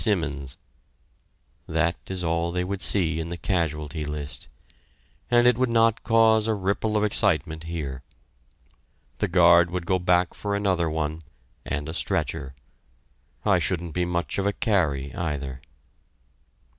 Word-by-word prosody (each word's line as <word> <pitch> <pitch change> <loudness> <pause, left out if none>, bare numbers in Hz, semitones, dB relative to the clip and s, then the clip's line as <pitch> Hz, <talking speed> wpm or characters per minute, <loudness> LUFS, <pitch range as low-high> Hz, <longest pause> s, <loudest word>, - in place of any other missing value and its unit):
Simmons" 75 - 0 1.1
that 85 +1 +1
is 95 -1 -3
all 85 0 0
they 90 +1 -1
would 95 +1 -4
see 80 -5 +2
in 80 +1 -4
the 85 - -5
casualty 75 -4 -2
list, 75 0 -5 0.8
and 120 0 +4
it 125 -1 +4
would 130 -1 +2
not 115 -1 +3
cause 110 -1 +4
a 110 - +1
ripple 100 +2 0
of 105 - +1
excitement 80 -6 +1
here. 75 -6 -5 1.2
The - - +1
guard 85 -1 +5
would 90 -1 -4
go 95 +1 +1
back 90 0 +2
for 100 -1 -3
another 95 -5 +1
one, 80 0 -3 0.4
and 75 +1 -3
a 80 - -5
stretcher... 65 -5 -2 0.9
I - - +4
shouldn't 85 -3 -2
be 90 0 0
much 85 +2 -2
of 100 - 0
a 100 - +1
carry, 80 - 0
either! 70 -6 -4
85 Hz, 145 wpm, -25 LUFS, 80-100 Hz, 1.2 s, guard